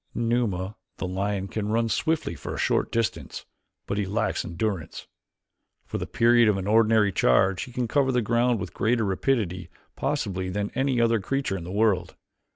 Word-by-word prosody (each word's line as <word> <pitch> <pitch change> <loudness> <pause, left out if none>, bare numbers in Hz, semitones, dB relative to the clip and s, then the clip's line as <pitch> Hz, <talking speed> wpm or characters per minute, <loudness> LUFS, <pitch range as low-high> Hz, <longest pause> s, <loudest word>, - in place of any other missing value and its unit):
Numa, 115 -5 -1 0.2
the - - -3
lion, 95 +1 -2
can 105 +1 -3
run 115 +1 +1
swiftly 160 - 0
for 80 - -6
a - - -6
short - - +1
distance, 115 -1 -2 0.4
but 100 - -2
he 100 - -1
lacks 100 - -1
endurance. 90 -1 -4 0.8
For - - -4
the - - -4
period 120 -1 +4
of 100 - +2
an 95 - -4
ordinary 110 -1 +4
charge 90 +5 +2
he 125 - -12
can 125 0 -2
cover 135 +2 +2
the 125 -2 +1
ground 120 +1 +2
with 90 -1 -6
greater 115 +2 +1
rapidity 95 -4 -1 0.3
possibly 95 -1 -2
than 100 +2 -2
any 135 -1 +1
other 115 -1 +3
creature 135 0 -2
in 85 -3 -6
the 90 - -6
world. 100 -4 +1
105 Hz, 175 wpm, -26 LUFS, 95-120 Hz, 0.8 s, period